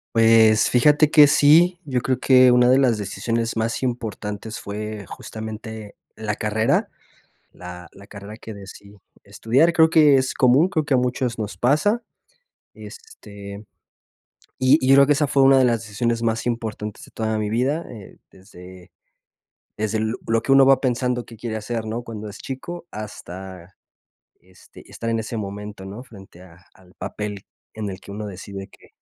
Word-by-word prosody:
Pues, 110 -1 +5
fíjate 150 +5 +4
que 150 -2 +8
sí, 165 +5 +5
yo 130 -4 -1
creo 130 +1 -1
que 130 -1 +5
una 125 0 +4
de 130 +1 +5
las 125 -5 +2
decisiones 115 +3 -3
más 115 +1 -1
importantes 110 -3 -5
fue 105 0 -6
justamente 110 -1 -8 0.2
la 110 -1 -3
carrera, 110 +1 0 0.6
la 90 -1 -11
la 100 +1 -15
carrera 105 +1 -10
que 110 -1 -10
decidí 100 +1 -13 0.3
estudiar. 135 +9 +1
Creo 160 -1 +4
que 155 -3 +5
es 130 0 -1
común, 130 +7 +4
creo 160 -5 -1
que 145 - 0
a - - +5
muchos 125 -1 -1
nos 105 -4 -5
pasa, 155 - +1 0.7
este, 105 - -12 0.9
y 130 +4 +4
y 130 - -1
yo 135 - +7
creo 140 0 +6
que 145 - +4
esa 145 +1 +1
fue 135 0 +2
una 135 0 +6
de 130 - +4
las 115 -2 0
decisiones 115 +2 -2
más 115 0 -1
importantes 110 -3 -4
de - - -16
toda 110 -1 -2
mi 105 -1 -2
vida, 135 +9 0
eh, 105 -5 -12
desde 90 -1 -15 0.9
desde 110 0 -1
l 110 +1 -1
lo 115 0 +1
que - - -1
uno 135 0 +7
va 135 -1 +5
pensando 125 -1 -1
qué 115 - -13
quiere 115 0 -5
hacer, 110 +1 -4
¿no? 115 +2 -4
Cuando 110 -2 -8
es 100 - -10
chico, 170 +7 -7
hasta, 95 -3 -9 0.7
este, 95 0 -18
estar 115 - -5
en 115 0 0
ese 115 +1 -6
momento, 105 -1 -7
¿no? 100 +5 -8
Frente 95 -7 -15
a 85 -3 -16 0.2
al 90 -1 -22
papel 105 -2 -6 0.3
en 110 -1 -5
el 95 -1 -7
que - - -13
uno 105 +1 -6
decide 95 0 -8
que - - -21
115 Hz, 175 wpm, -22 LUFS, 105-130 Hz, 0.9 s, que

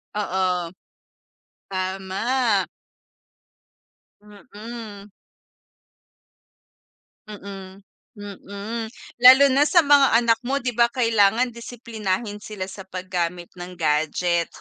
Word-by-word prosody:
Oo. 185 -4 -1 1.0
Tama. 195 +4 -1 1.6
Mm. 210 -1 -11 2.2
Mm, 195 -2 -10 0.4
mm. 205 +3 -7 0.4
Lalo 260 +3 +9
na 285 +2 +4
sa 345 +3 +4
mga 280 -1 +6
anak 235 -1 +2
mo, 270 +3 -1
'di 245 -2 -3
ba? 235 0 +4
Kailangan 230 0 +2
disiplinahin 220 -3 -5
sila 210 -3 -6
sa 195 0 -10
paggamit 180 -2 -4
ng 180 0 -9
gadget. 165 +2 0
205 Hz, 80 wpm, -22 LUFS, 185-235 Hz, 2.2 s, Lalo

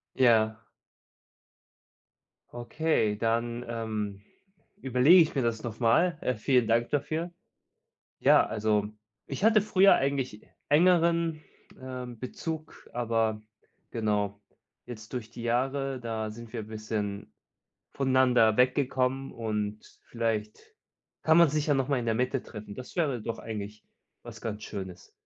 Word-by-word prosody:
Ja 110 -4 +4 2.0
Okay, 120 -3 0
dann, 115 +2 -1
ähm, 110 -3 -4 0.6
überlege 135 +8 +6
ich 155 - -3
mir 135 - +2
das 115 -2 -1
noch 115 -2 -6
mal. 150 +9 +3
Äh, 125 - 0
vielen 125 +2 +2
dank 115 +1 +1
dafür. 155 +4 -2 0.9
Ja, - - +6
also, 105 -1 0 0.4
ich - - -5
hatte 220 -1 +5
früher 195 -1 +5
eigentlich 135 -5 -1 0.3
engeren, 170 0 +3 0.4
ähm, 125 -2 -7
Bezug, 155 +6 -7
aber 115 -2 0 0.5
genau 105 -2 -1 0.5
jetzt 110 -1 -10
durch 120 -3 -4
die 115 0 -9
Jahre, 135 +3 -1
da 110 -2 -4
sind 115 +1 -11
wir 115 -3 -4
bisschen 105 -5 -5 0.6
voneinander 130 -5 +3
weggekommen 130 +1 +1
und 105 -2 -4
vielleicht 110 -2 -3 0.5
kann 160 +1 +5
man 170 - +7
sich 150 +1 -1
ja 145 - +4
noch 135 -1 0
mal 140 -3 +1
in 120 - -4
der 115 -1 +1
Mitte 125 +2 -1
treffen. 105 -2 -9
Das 130 +6 -10
wäre 140 -9 0
doch 115 +1 -4
eigentlich 105 -1 -7 0.4
was - - -10
ganz 105 -2 -5
Schönes. 95 -4 -8
120 Hz, 130 wpm, -28 LUFS, 110-135 Hz, 2.0 s, man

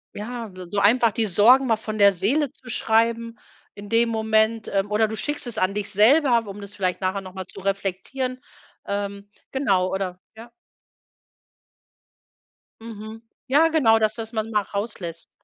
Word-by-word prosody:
Ja, 230 0 -6
s 180 -1 -9
so 205 - -3
einfach 225 +3 +4
die 225 +2 -1
Sorgen 220 +8 +5
mal 230 -3 +2
von 215 -1 -6
der 200 -1 +6
Seele 260 - 0
zu 250 - -15
schreiben 230 +1 +1 0.4
in 205 0 -11
dem 230 +1 +3
Moment. 220 0 +1
Ähm. 200 +1 -1
Oder 215 +1 +3
du 220 - -5
schickst 295 0 -3
es 240 - -5
an 185 +1 +1
dich 205 0 -3
selber, 235 +3 +4
um 200 +1 -8
das 200 0 -10
vielleicht 185 -1 -2
nachher 190 +1 -1
noch 185 -1 -11
mal 190 -1 -7
zu - - -11
reflektieren. 195 +7 -3 0.5
Ähm, 200 0 -4 0.2
genau, 195 -9 +1
oder 185 -2 -3 0.2
ja. 230 +2 -11 2.3
Mhm. 220 0 -9 0.3
Ja 295 +5 +4
genau, 230 -9 +4
dass 215 0 +1
du 230 - -5
das 225 +1 -8
manchmal 215 -2 -1
rauslässt. 200 -5 -6
215 Hz, 165 wpm, -23 LUFS, 200-230 Hz, 2.3 s, der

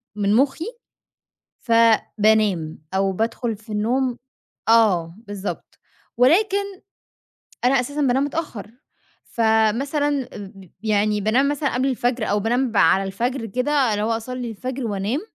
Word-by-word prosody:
من 205 -1 +1
مُخّي 275 +5 +1 1.0
فبانام 215 -6 +2 0.2
أو 195 0 +1
بادخُل 225 +2 -2
في 215 +1 -12
النوم 245 +4 0 0.5
آه 190 -8 +3
بالضبط 205 -1 -6 0.4
ولكن، 380 - +4 1.1
أنا 260 +1 +4
أساسًا 285 +4 -4
بانام 265 0 +2
متأخر 285 -9 -5 0.5
فمثلاً 255 +6 +1
أ - - -8 0.2
ب 190 -3 -14
يعني 210 -1 +1
بانام 245 +7 +2
مثلًا 290 -2 -1
قبل 255 +2 +1
الفجر 245 -2 -1
أو 210 - +2
بانام 245 +3 0
ب 210 - -2
على 190 +4 +4
الفجر 230 +6 -2
كده 250 +7 -2 0.2
اللي 210 0 -1
هو 220 - -1
أصلّي 240 +1 -4
الفجر 255 +3 -5
وأنام 205 +6 -2
230 Hz, 130 wpm, -22 LUFS, 210-260 Hz, 1.1 s, ولكن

